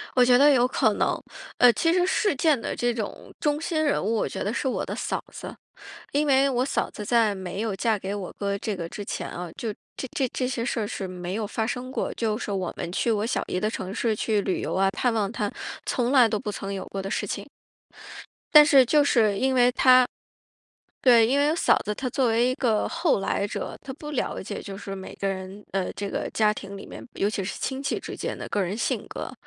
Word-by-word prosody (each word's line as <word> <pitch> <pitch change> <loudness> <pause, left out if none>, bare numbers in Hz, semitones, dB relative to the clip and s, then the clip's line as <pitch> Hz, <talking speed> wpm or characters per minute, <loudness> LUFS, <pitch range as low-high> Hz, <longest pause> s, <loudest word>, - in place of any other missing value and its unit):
我 250 - +6
觉 245 0 +6
得 290 +3 +7
有 250 -3 +4
可 220 -4 +2
能， - - 0 0.4
呃， 245 -1 +7
其 330 +6 +2
实 360 +1 +3
事 390 -2 +1
件 290 -2 +3
的 - - -4
这 240 0 0
种 220 -3 -6
中 295 0 +1
心 320 -1 -1
人 290 - +1
物 215 +4 0
我 220 - 0
觉 - - -4
得 205 - -1
是 265 - -1
我 260 - -1
的 - - -4
嫂 - - -3
子， - - -8 0.6
因 295 +2 +2
为 275 0 +4
我 255 -1 +1
嫂 275 - -1
子 210 - -7
在 225 -2 +3
没 190 0 -5
有 215 -3 -2
嫁 220 +1 +1
给 195 +1 -4
我 200 -3 -5
哥 200 -1 -1
这 210 +1 -3
个 170 -3 -5
之 205 - -7
前 - - -4
啊， 175 -1 -6
就 225 -2 -3 0.2
这 265 - -5
这 270 - +2
这 255 +1 -2
些 240 -2 -2
事 240 - -1
儿 210 - -1
是 195 - -4
没 180 0 -5
有 215 0 -2
发 220 +2 -2
生 245 +2 -4
过， - - -2
就 220 -2 -1
是 235 - -5
我 190 -3 -2
们 170 - -4
去 230 +6 +1
我 210 0 0
小 235 - -1
姨 180 - -1
的 215 - +1
城 190 -3 -5
市 225 -1 0
去 215 -1 +1
旅 190 -2 -1
游 - - -2
啊、 195 +1 +3
探 240 +5 0
望 210 -3 0
她， 210 -3 -2 0.3
从 245 -2 0
来 255 -4 +7
都 215 -1 -1
不 210 - -3
曾 200 -1 -5
有 195 - -5
过 195 - -5
的 195 - -5
事 - - -1
情。 - - -4 1.1
但 300 - +11
是 280 -4 +6
就 295 +4 +4
是 220 -7 +3
因 265 +5 +1
为 245 -1 +5
她 255 0 +6 1.0
对， 240 -3 +6
因 270 +4 +2
为 295 +2 +3
嫂 - - +4
子 210 - -1
她 260 - -4
作 260 +1 +1
为 230 +1 +3
一 255 - +1
个 225 -6 +1
后 330 - +1
来 200 +1 0
者， - - -5
她 265 - -9
不 300 +1 -8
了 290 - -2
解， - - -5
就 195 -1 -7
是 195 0 -6
每 190 -1 -8
个 200 - -4
人 195 +1 -5
呃， 190 -1 -1
这 200 -1 -4
个 - - -2
家 215 -1 +3
庭 200 -1 -8
里 195 - -9
面 - - -9
尤 200 - 0
其 205 - -2
是 190 - -5
亲 265 0 -3
戚 275 - -1
之 - - -7
间 - - -4
的 - - -6
个 205 - 0
人 190 +1 -1
性 230 - -1
格、 - - -6
225 Hz, 270 characters per minute, -25 LUFS, 200-260 Hz, 1.1 s, 但